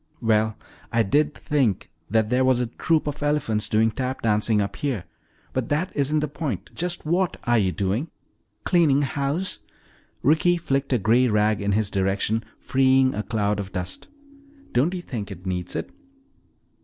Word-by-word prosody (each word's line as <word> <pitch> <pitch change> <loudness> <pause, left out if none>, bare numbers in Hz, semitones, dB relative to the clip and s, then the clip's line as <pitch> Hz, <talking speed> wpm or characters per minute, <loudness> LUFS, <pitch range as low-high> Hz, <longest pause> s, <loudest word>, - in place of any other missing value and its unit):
"Well, 110 -2 +1 0.3
I 115 -1 +3
did 150 +8 +1
think 130 -10 0 0.2
that 110 +2 +1
there 125 +1 +3
was 130 -1 +3
a 125 - +1
troop 155 +7 0
of 145 0 -4
elephants 145 -8 0
doing 110 +1 +3
tap 130 +3 -3
dancing 105 0 +2
up 100 -1 -2
here. 130 -10 -2 0.5
But 130 -3 -2
that 155 +5 0
isn't 150 +2 +1
the 150 - 0
point 140 - -4
just 175 -1 -2
what 175 +3 +1
are 120 -1 +3
you 95 -3 +1
doing?" 100 - -1 0.5
"Cleaning 155 -6 +3
house." 140 +7 -2 0.6
Ricky 160 +5 +4
flicked 140 -5 -1
a 125 - +4
gray 115 +5 +3
rag 105 -1 +2
in 100 0 0
his 105 -1 +1
direction 100 +3 0
freeing 130 0 +3
a 105 - -2
cloud 105 -1 -1
of 100 -1 -6
dust. 90 0 -4 0.6
"Don't 145 +10 +2
you 175 - -5
think 110 -10 -5
it 95 -2 -10
needs 90 -1 -3
it?" - - -4
120 Hz, 170 wpm, -24 LUFS, 105-145 Hz, 0.6 s, Ricky